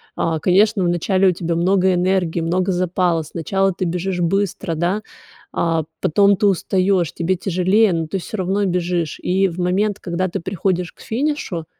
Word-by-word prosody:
А, 165 Hz, -1 st, -1 dB
конечно 200 Hz, +4 st, +3 dB
вначале 185 Hz, +2 st, +2 dB
у -, -, +3 dB
тебя 170 Hz, -1 st, -3 dB
много 185 Hz, +2 st, +2 dB
энергии, 180 Hz, -2 st, 0 dB
много 180 Hz, +3 st, 0 dB
запала. 175 Hz, -2 st, 0 dB
Сначала 190 Hz, +5 st, -1 dB
ты 185 Hz, -, -3 dB
бежишь 180 Hz, +2 st, -2 dB
быстро 180 Hz, -1 st, -1 dB
да, 175 Hz, +6 st, 0 dB, 0.5 s
а, 165 Hz, -2 st, 0 dB, 0.2 s
потом 200 Hz, +4 st, +3 dB
ты 210 Hz, -, +1 dB
устаешь, 185 Hz, -2 st, +1 dB
тебе 175 Hz, +3 st, 0 dB
тяжелее 190 Hz, +4 st, +2 dB
но 165 Hz, -1 st, -2 dB
ты 195 Hz, +4 st, -3 dB
всё 210 Hz, +4 st, -6 dB
равно 190 Hz, +2 st, 0 dB
бежишь. 175 Hz, -3 st, -1 dB
И 190 Hz, +2 st, +2 dB
в 170 Hz, -, -9 dB
момент, 195 Hz, +3 st, 0 dB
когда 180 Hz, +1 st, -2 dB
ты -, -, -3 dB
приходишь 180 Hz, -1 st, -2 dB
к -, -, -19 dB
финишу, 235 Hz, -, -2 dB
180 Hz, 170 wpm, -20 LUFS, 170-195 Hz, 0.5 s, конечно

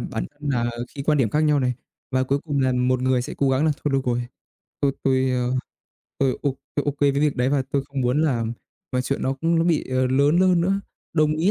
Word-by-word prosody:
bản -, -, -4 dB
thân 145 Hz, 0 st, -5 dB
là 120 Hz, -2 st, 0 dB, 0.2 s
khi 140 Hz, -, -4 dB
quan 150 Hz, +1 st, +2 dB
điểm 115 Hz, -6 st, +2 dB
khác 150 Hz, -, +1 dB
nhau 150 Hz, -2 st, +3 dB
này, 125 Hz, -1 st, 0 dB, 0.4 s
và 130 Hz, 0 st, +1 dB
cuối 140 Hz, +2 st, +1 dB
cùng 145 Hz, -3 st, -1 dB
là 130 Hz, -1 st, +2 dB
một 125 Hz, 0 st, +1 dB
người 130 Hz, -1 st, +2 dB
sẽ -, -, -6 dB
cố 140 Hz, -, +2 dB
gắng 135 Hz, +4 st, +2 dB
là 155 Hz, -, +3 dB
"Thôi 145 Hz, -, +1 dB
được 135 Hz, -, +2 dB
rồi, 120 Hz, 0 st, +1 dB, 0.6 s
tôi 140 Hz, -1 st, +2 dB
tôi, 130 Hz, -1 st, +2 dB
ơ, 125 Hz, 0 st, 0 dB, 0.7 s
tôi 135 Hz, -2 st, +1 dB
ô 135 Hz, -2 st, 0 dB, 0.2 s
tôi 145 Hz, -, 0 dB
OK 145 Hz, 0 st, -2 dB
với 145 Hz, -1 st, +5 dB
việc 145 Hz, 0 st, +1 dB
đấy 125 Hz, +1 st, +2 dB
và 140 Hz, -1 st, +2 dB
tôi 140 Hz, -1 st, +1 dB
không 140 Hz, -1 st, -4 dB
muốn 130 Hz, +5 st, +2 dB
làm 115 Hz, -7 st, 0 dB, 0.5 s
chuyện 140 Hz, -, -2 dB
nó 135 Hz, -, +1 dB
cũng 165 Hz, +4 st, +1 dB
nó 165 Hz, -, +2 dB
bị, 170 Hz, -3 st, +1 dB
ờ, 130 Hz, 0 st, +2 dB
lớn 140 Hz, +5 st, +3 dB
hơn 185 Hz, -2 st, +4 dB
nữa." 195 Hz, +3 st, +1 dB, 0.3 s
Đồng 155 Hz, -1 st, +3 dB
ý 175 Hz, +5 st, +2 dB
135 Hz, 250 wpm, -23 LUFS, 130-150 Hz, 0.7 s, với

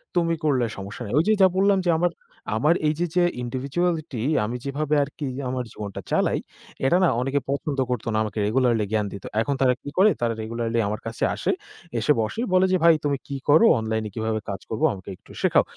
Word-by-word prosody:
তুমি 165 Hz, -1 st, +2 dB
করলে 130 Hz, -5 st, +2 dB
সমস্যা 100 Hz, +4 st, -8 dB
নাই। 105 Hz, -, -6 dB
ঐযে 215 Hz, +7 st, +3 dB
যা 190 Hz, -, +8 dB
বললাম 195 Hz, +1 st, +4 dB
যে -, -, +2 dB
আমার 175 Hz, +1 st, +2 dB, 0.8 s
এইযে 160 Hz, +3 st, 0 dB
যে 180 Hz, -, +4 dB, 0.2 s
ইন্ডিভিজুয়ালিটি 140 Hz, +2 st, -2 dB, 0.2 s
আমি 120 Hz, +3 st, -4 dB
যেভাবে 150 Hz, +2 st, -1 dB
আরকি 145 Hz, +1 st, -6 dB, 0.2 s
আমার 130 Hz, -1 st, -2 dB
জীবনটা 100 Hz, -2 st, -6 dB
চালাই, -, -, +2 dB, 0.5 s
এটা 175 Hz, +7 st, +4 dB
না -, -, +5 dB
অনেকে 135 Hz, +2 st, 0 dB
পছন্দ 140 Hz, 0 st, -2 dB
করত 125 Hz, -2 st, -2 dB
না -, -, +1 dB
আমাকে 105 Hz, 0 st, -4 dB
রেগুলারলি 115 Hz, -2 st, +2 dB
জ্ঞান 105 Hz, -1 st, +1 dB
দিত। 100 Hz, -, -8 dB, 0.2 s
এখন 140 Hz, +4 st, -1 dB
তারা 125 Hz, -1 st, +5 dB
কি 145 Hz, -, -7 dB
করে? 205 Hz, +2 st, +6 dB
তারা 115 Hz, -1 st, +1 dB
রেগুলারলি 115 Hz, +1 st, -2 dB
আমার 105 Hz, +1 st, -3 dB
কাছে 115 Hz, -, -4 dB
আসে -, -, 0 dB, 0.5 s
এসে 110 Hz, -, +2 dB
বসে। 110 Hz, -, -2 dB
বলে 185 Hz, +1 st, +5 dB
যে, 185 Hz, -, +4 dB
"ভাই 170 Hz, -1 st, +8 dB
তুমি 140 Hz, -1 st, +1 dB
কী 140 Hz, -, -4 dB
কর? 145 Hz, +2 st, +7 dB, 0.2 s
অনলাইন 110 Hz, 0 st, -2 dB
এ -, -, -7 dB
কীভাবে 110 Hz, -1 st, -1 dB
কাজ 95 Hz, -1 st, -4 dB
করব 110 Hz, -, -3 dB
আমাকে 95 Hz, 0 st, -10 dB
একটু -, -, -19 dB
শেখাও।" -, -, +4 dB
130 Hz, 200 wpm, -24 LUFS, 110-160 Hz, 0.8 s, যা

